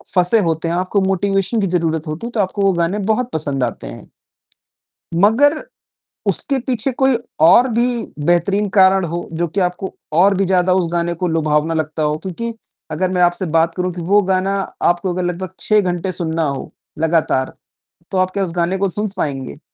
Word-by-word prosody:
फँसे 180 Hz, +5 st, +4 dB
होते 165 Hz, -1 st, -1 dB
हैं, 170 Hz, -, 0 dB
आपको 185 Hz, +3 st, 0 dB
मोटिवेशन 195 Hz, +3 st, 0 dB
की 195 Hz, -, +1 dB
ज़रूरत 165 Hz, -3 st, -1 dB
होती 155 Hz, +10 st, -4 dB
है, -, -, -7 dB
तो 230 Hz, -, -3 dB
आपको 200 Hz, +1 st, -1 dB
वो 195 Hz, -1 st, +4 dB
गाने 170 Hz, +4 st, 0 dB
बहुत 245 Hz, +3 st, 0 dB
पसंद 145 Hz, -4 st, -1 dB
आते 120 Hz, -, -4 dB
हैं। -, -, -8 dB, 1.1 s
मगर 240 Hz, -, +4 dB, 0.7 s
उसके 275 Hz, -2 st, 0 dB
पीछे 250 Hz, 0 st, +1 dB
कोई 265 Hz, 0 st, +2 dB, 0.2 s
और 235 Hz, +11 st, +6 dB
भी 235 Hz, +2 st, +2 dB, 0.4 s
बेहतरीन 195 Hz, +4 st, +2 dB
कारण 190 Hz, -1 st, +5 dB
हो, 170 Hz, +1 st, -4 dB
जो 170 Hz, +1 st, -1 dB
कि 190 Hz, +6 st, -2 dB
आपको 180 Hz, +1 st, -2 dB, 0.3 s
और 195 Hz, +3 st, +5 dB
भी 195 Hz, -, +1 dB
ज़्यादा 185 Hz, 0 st, +2 dB
उस 185 Hz, -1 st, +2 dB
गाने 170 Hz, 0 st, 0 dB
को 175 Hz, +1 st, -2 dB
लुभावना 155 Hz, 0 st, +1 dB
लगता 155 Hz, 0 st, -2 dB
हो, 150 Hz, 0 st, +1 dB
क्योंकि 215 Hz, +7 st, -5 dB, 0.4 s
अगर 180 Hz, +4 st, -1 dB
मैं 180 Hz, -1 st, +1 dB
आपसे 175 Hz, +2 st, +2 dB
बात 165 Hz, +1 st, +1 dB
करूँ 180 Hz, 0 st, -2 dB
कि 175 Hz, -, -6 dB
वो 205 Hz, -, +7 dB
गाना 190 Hz, +1 st, 0 dB, 0.3 s
आपको 175 Hz, +1 st, 0 dB
अगर 180 Hz, 0 st, -2 dB
लगभग 180 Hz, +1 st, -4 dB
6 215 Hz, -1 st, +3 dB
घंटे 180 Hz, -1 st, -2 dB
सुनना 165 Hz, -2 st, -2 dB
हो, 140 Hz, -3 st, -4 dB, 0.3 s
लगातार, 160 Hz, -5 st, +1 dB, 0.6 s
तो 190 Hz, -, -1 dB
आप 185 Hz, 0 st, +1 dB
क्या 200 Hz, +1 st, -1 dB
उस 180 Hz, -, -3 dB
गाने 175 Hz, +2 st, 0 dB
को 195 Hz, 0 st, 0 dB
सुन 210 Hz, +4 st, -2 dB
स 195 Hz, -, -7 dB
पाएँगे? 135 Hz, -, -3 dB
180 Hz, 195 wpm, -18 LUFS, 165-195 Hz, 1.1 s, वो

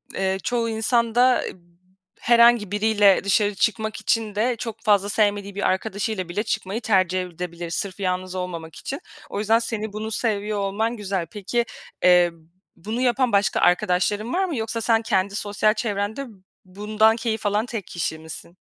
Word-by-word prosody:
eee, 190 Hz, 0 st, 0 dB
çoğu 235 Hz, -2 st, 0 dB
insan 225 Hz, +1 st, +1 dB
da 250 Hz, +1 st, +4 dB
eb -, -, -8 dB, 0.6 s
herhangi 235 Hz, -4 st, +5 dB
biriyle 205 Hz, -2 st, +4 dB
dışarı 205 Hz, +1 st, +2 dB
çıkmak 220 Hz, +1 st, 0 dB
için 220 Hz, -2 st, 0 dB
de 235 Hz, +3 st, +1 dB
çok 225 Hz, -1 st, -6 dB
fazla 205 Hz, -2 st, +3 dB
sevmediği 205 Hz, -2 st, 0 dB
bir 205 Hz, -, +1 dB
arkadaşıyla 195 Hz, -1 st, -2 dB
bile 205 Hz, +5 st, -1 dB
çıkmayı 215 Hz, +1 st, -3 dB
tercih 185 Hz, -4 st, +2 dB
edebilir 175 Hz, -1 st, -6 dB
sırf 195 Hz, +3 st, -4 dB
yalnız 185 Hz, 0 st, -2 dB
olmamak 170 Hz, -3 st, -5 dB
için. 275 Hz, -, -5 dB, 0.3 s
O -, -, -4 dB
yüzden 220 Hz, +2 st, +3 dB
seni 220 Hz, -2 st, -4 dB
bunu 220 Hz, +1 st, -4 dB
seviyor 210 Hz, -2 st, -1 dB
olman 220 Hz, +4 st, -1 dB
güzel. 195 Hz, -4 st, -2 dB
Peki, 235 Hz, +4 st, -1 dB, 0.4 s
eee, 180 Hz, -1 st, +6 dB, 0.4 s
bunu 220 Hz, +7 st, -4 dB
yapan 250 Hz, 0 st, +2 dB
başka 200 Hz, 0 st, +2 dB
arkadaşların 180 Hz, -, +1 dB
var 380 Hz, +1 st, +2 dB
mı? 320 Hz, -8 st, -3 dB
Yoksa 225 Hz, +1 st, -3 dB
sen 225 Hz, -1 st, +3 dB
kendi 200 Hz, -3 st, 0 dB
sosyal 210 Hz, +1 st, +1 dB
çevrende 215 Hz, +3 st, -3 dB, 0.4 s
bundan 210 Hz, +4 st, +2 dB
keyif 225 Hz, -2 st, -3 dB
alan 210 Hz, +2 st, +1 dB
tek 225 Hz, -6 st, -6 dB
kişi 160 Hz, -2 st, -3 dB
misin? 160 Hz, +2 st, -10 dB
210 Hz, 160 wpm, -23 LUFS, 190-225 Hz, 0.6 s, eee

